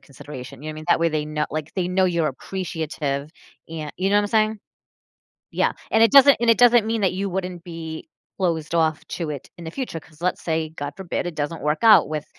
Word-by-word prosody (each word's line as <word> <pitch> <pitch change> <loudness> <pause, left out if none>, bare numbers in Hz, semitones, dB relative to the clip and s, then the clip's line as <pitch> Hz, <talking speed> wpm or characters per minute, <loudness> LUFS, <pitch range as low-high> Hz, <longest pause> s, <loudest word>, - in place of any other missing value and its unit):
consideration, 135 -1 -10
you 155 - -6
know - - -2
I - - -10
mean? 155 0 -8
That - - +4
way 165 - +3
they 150 -1 -1
kno 150 0 -2
like, 155 +1 -4
they 185 -2 0
know 185 +1 +2
you're 170 -3 +1
appreciative, 155 -3 -4 0.4
a 155 -2 -5
you 185 +2 0
know 205 - +4
what - - +5
I'm 205 - -1
saying? 215 0 +1 0.9
Yeah, - - +1 0.2
and 225 +1 +5
it 230 - +5
doesn't 280 0 +8
and 235 - +3
it - - +3
doesn't 240 -2 +6
mean 225 -1 -1
that 190 -2 +2
you 195 +1 -2
wouldn't 180 -2 -4
be 165 - -7 0.3
closed 165 -3 -1
off 160 -2 +1
to 165 -3 -4
it 140 - -8
in 170 - -10
the 160 - -6
future, 245 -10 -4
'cause 155 +1 -21
let's 180 - -1
say, 160 -1 -1
god 145 -1 -5
forbid, 190 -2 -3
it 165 - -6
doesn't 150 +3 -3
work 150 +1 0
out 215 -8 +7
with 155 -1 -3
165 Hz, 235 wpm, -23 LUFS, 155-190 Hz, 0.9 s, doesn't